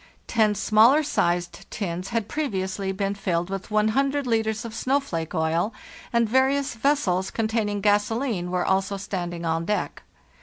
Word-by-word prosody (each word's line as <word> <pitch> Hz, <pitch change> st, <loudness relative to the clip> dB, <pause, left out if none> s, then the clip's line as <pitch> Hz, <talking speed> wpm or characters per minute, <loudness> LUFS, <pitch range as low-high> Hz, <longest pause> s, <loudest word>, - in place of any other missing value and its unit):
Ten 215 Hz, -2 st, +2 dB
smaller 220 Hz, +8 st, +5 dB
sized 175 Hz, -8 st, -1 dB
tins 180 Hz, -3 st, -4 dB
had 230 Hz, -3 st, -1 dB
previously 195 Hz, -9 st, -2 dB
been 195 Hz, +1 st, -1 dB
filled 180 Hz, -2 st, -2 dB
with 195 Hz, 0 st, -4 dB
too 215 Hz, -, -1 dB, 0.5 s
litres 225 Hz, -2 st, 0 dB
of 225 Hz, -, -6 dB
snowflake 225 Hz, -, -1 dB
oil, 165 Hz, +6 st, 0 dB, 0.4 s
and 235 Hz, -2 st, +2 dB
various 265 Hz, +4 st, +2 dB
vessels 220 Hz, -8 st, +1 dB
containing 215 Hz, -2 st, -1 dB
gasoline 210 Hz, -1 st, +1 dB
were 180 Hz, 0 st, 0 dB
also 195 Hz, +1 st, +1 dB
standing 175 Hz, -3 st, -4 dB
on 165 Hz, 0 st, 0 dB
deck. 210 Hz, +3 st, -2 dB
205 Hz, 140 wpm, -25 LUFS, 180-230 Hz, 0.5 s, smaller